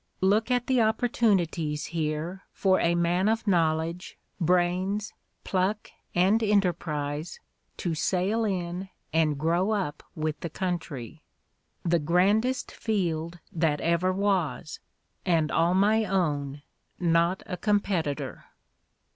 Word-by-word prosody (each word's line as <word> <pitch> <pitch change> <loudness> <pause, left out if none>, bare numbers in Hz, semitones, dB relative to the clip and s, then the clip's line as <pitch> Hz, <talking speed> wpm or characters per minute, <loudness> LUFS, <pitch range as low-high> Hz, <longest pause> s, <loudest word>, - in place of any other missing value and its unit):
— - - -40
"Look 220 +3 +1
at 245 -1 +1
the 255 -2 +3
opportunities 200 - +1
here 160 +3 -3
for 190 -1 +2
a 170 0 +2
man 175 +4 +2
of 225 0 0
knowledge, 165 -2 0 0.2
brains, 180 +4 +1 0.3
pluck 195 +3 -1 0.2
and 190 +6 +4
enterprise 165 -7 0 0.4
to 175 - -2
sail 190 +7 0
in 185 -2 -2 0.2
and 155 -3 +2
grow 170 +6 +1
up 190 -9 -1
with 155 -1 -2
the 170 - -4
country. 165 - -4 0.6
The 170 0 +3
grandest 200 - +2
field 175 -6 -2
that 160 -3 +1
ever 170 +2 +2
was; 185 -6 -1 0.4
and 165 -4 +2
all 170 +2 +3
my 215 +3 +3
own, 145 -7 -1 0.4
not 170 +1 +2
a 195 - -4
competitor." 185 -7 -1
175 Hz, 115 wpm, -27 LUFS, 160-200 Hz, 0.6 s, and